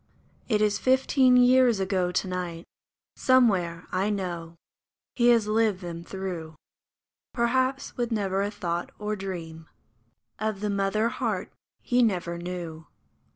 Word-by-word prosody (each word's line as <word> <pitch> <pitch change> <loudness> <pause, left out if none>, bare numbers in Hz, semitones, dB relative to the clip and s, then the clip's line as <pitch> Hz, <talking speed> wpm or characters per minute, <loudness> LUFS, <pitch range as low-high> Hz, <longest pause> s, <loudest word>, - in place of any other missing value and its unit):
It 215 -2 +2
is 210 -1 +1
fifteen 260 0 +4
years 250 -3 +5
ago 185 -2 0
to 190 - -1
night; 180 -2 -4 0.5
Somewhere, 190 -10 +2
I 190 +3 0
know, 175 -5 -4 0.6
he 240 -1 +3
has 235 -3 +5
lived 215 -2 +1
them 170 -1 -6
through, 175 -4 -6 0.8
Perhaps 260 +3 0
with 240 -1 -1
never 195 -3 0
a 200 - 0
thought 175 -4 -3
or 210 0 -3
dream 165 -5 -7 0.7
Of 215 -2 -2
the 210 -1 -1
mother 200 +3 +1
heart - - -3 0.3
he 250 0 +2
never 180 -6 0
knew 170 -3 -6
195 Hz, 130 wpm, -26 LUFS, 175-230 Hz, 0.8 s, years